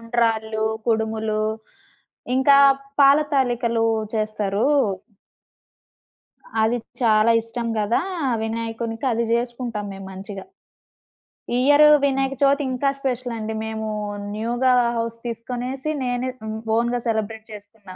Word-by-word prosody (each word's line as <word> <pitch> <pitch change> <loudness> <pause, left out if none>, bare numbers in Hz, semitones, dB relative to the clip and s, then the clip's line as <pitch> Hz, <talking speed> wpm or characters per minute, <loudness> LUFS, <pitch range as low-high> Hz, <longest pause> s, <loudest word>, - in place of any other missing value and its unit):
ఉండ్రాళ్ళు, 225 -2 0 0.2
కుడుములు 220 -1 0 0.9
ఇంకా 275 +1 +6 0.4
పాల 280 +1 +7 0.2
తాళికలు 240 -3 +1 0.3
చేస్తారు... 215 -1 -1 1.9
అది 230 +2 +2 0.2
చాలా 220 -1 +4
ఇష్టం 230 +1 -5
గదా! 215 +2 +1 0.4
వినాయకునికి. 225 +1 -4
అది 230 0 0
జేసుకుంటాం 235 -2 -2
మేము 195 0 -9
మంచిగా. 195 +1 -8 1.1
ఈ - - +2
ఇయర్ 290 +1 +6 0.2
వినాయక 270 0 0
చవితి 280 +1 +3
ఇంకా 255 +2 +1
స్పెషలండి. 240 -4 -3
మేము 220 0 -4 0.4
న్యూగా 240 +4 +1 0.3
హౌస్ 230 0 -3
తీసుకొనేసి 250 +5 -4
నేనే 250 0 -1
హ్మ్ 220 0 -5 0.2
ఓన్‌గా 240 +1 0
సెలబ్రేట్ 220 0 -2
చేసుకున్నా. 205 -2 -12
230 Hz, 100 wpm, -22 LUFS, 220-245 Hz, 1.9 s, పాల